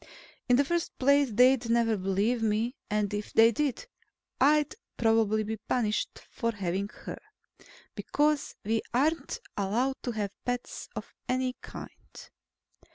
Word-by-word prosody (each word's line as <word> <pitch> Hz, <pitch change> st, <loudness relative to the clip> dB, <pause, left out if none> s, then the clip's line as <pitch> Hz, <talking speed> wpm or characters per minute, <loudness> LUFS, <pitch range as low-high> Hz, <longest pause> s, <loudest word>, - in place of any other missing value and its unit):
In 245 Hz, -, +6 dB
the 280 Hz, +3 st, +4 dB
first 345 Hz, +3 st, -2 dB
place, 280 Hz, +1 st, +4 dB
they'd 250 Hz, +2 st, +4 dB
never 230 Hz, -1 st, +3 dB
believe 200 Hz, +5 st, 0 dB
me. 225 Hz, +3 st, 0 dB
And, 210 Hz, -1 st, 0 dB
if 205 Hz, 0 st, -4 dB
they 225 Hz, +1 st, +7 dB
did, 290 Hz, -, -1 dB, 0.5 s
I'd 295 Hz, +2 st, +4 dB, 0.2 s
probably 225 Hz, -2 st, +3 dB
be 220 Hz, +1 st, -3 dB
punished 215 Hz, 0 st, -1 dB
for 230 Hz, -2 st, -1 dB
having 195 Hz, 0 st, -2 dB
her. -, -, -6 dB, 0.7 s
Because 295 Hz, 0 st, 0 dB
we 220 Hz, +1 st, +1 dB
aren't 295 Hz, +2 st, +1 dB, 0.2 s
allowed 235 Hz, +7 st, 0 dB
to 245 Hz, -, -3 dB
have 205 Hz, -3 st, -2 dB
pets 245 Hz, 0 st, -4 dB
of -, -, -7 dB, 0.2 s
any 255 Hz, 0 st, 0 dB
kind. -, -, -8 dB
230 Hz, 135 wpm, -29 LUFS, 210-265 Hz, 0.7 s, they